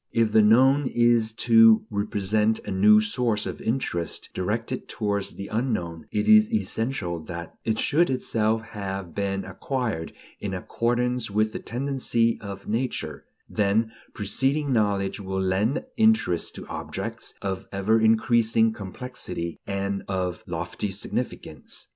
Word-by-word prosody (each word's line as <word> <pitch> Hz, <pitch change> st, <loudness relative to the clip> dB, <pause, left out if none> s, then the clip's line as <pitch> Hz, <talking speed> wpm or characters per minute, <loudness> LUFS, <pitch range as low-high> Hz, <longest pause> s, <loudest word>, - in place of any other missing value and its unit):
If 115 Hz, -2 st, +2 dB
the 110 Hz, 0 st, +6 dB
known 130 Hz, +6 st, +5 dB
is 120 Hz, -2 st, +3 dB
to 115 Hz, -1 st, +7 dB
represent 105 Hz, +1 st, +1 dB
a -, -, -4 dB
new 105 Hz, +3 st, +6 dB
source 110 Hz, -1 st, 0 dB
of -, -, -5 dB
interest 100 Hz, -, -2 dB
directed 115 Hz, +7 st, -2 dB
towards 100 Hz, -3 st, -2 dB
the 100 Hz, -, -6 dB
unknown, 105 Hz, -9 st, -2 dB
it 105 Hz, -, -1 dB
is 215 Hz, +1 st, +6 dB
essential 115 Hz, -, -1 dB
that 85 Hz, -1 st, -7 dB
it 110 Hz, -1 st, +1 dB
should 165 Hz, +9 st, +2 dB
itself 115 Hz, -3 st, 0 dB
have 95 Hz, -4 st, -5 dB
been 100 Hz, +1 st, -2 dB
acquired 120 Hz, -12 st, -3 dB, 0.3 s
in -, -, -3 dB
accordance 120 Hz, 0 st, -1 dB
with 110 Hz, +2 st, +1 dB
the -, -, -4 dB
tendency 120 Hz, -2 st, 0 dB
of 100 Hz, -2 st, -8 dB
nature; 105 Hz, -, -3 dB, 0.2 s
then 110 Hz, +2 st, +1 dB, 0.2 s
preceding 135 Hz, +7 st, 0 dB
knowledge 100 Hz, -3 st, +1 dB
will 95 Hz, -1 st, -3 dB
lend 100 Hz, -, 0 dB
interest 220 Hz, -, +2 dB
to -, -, -8 dB
objects -, -, -6 dB
of 95 Hz, -1 st, -3 dB
ever 105 Hz, +3 st, +2 dB
increasing 115 Hz, 0 st, +3 dB
complexity 100 Hz, -4 st, -6 dB
and 100 Hz, 0 st, -2 dB
of 90 Hz, -2 st, -2 dB
lofty 105 Hz, -, -3 dB
significance. 95 Hz, +1 st, -5 dB
110 Hz, 130 wpm, -25 LUFS, 100-120 Hz, 0.3 s, to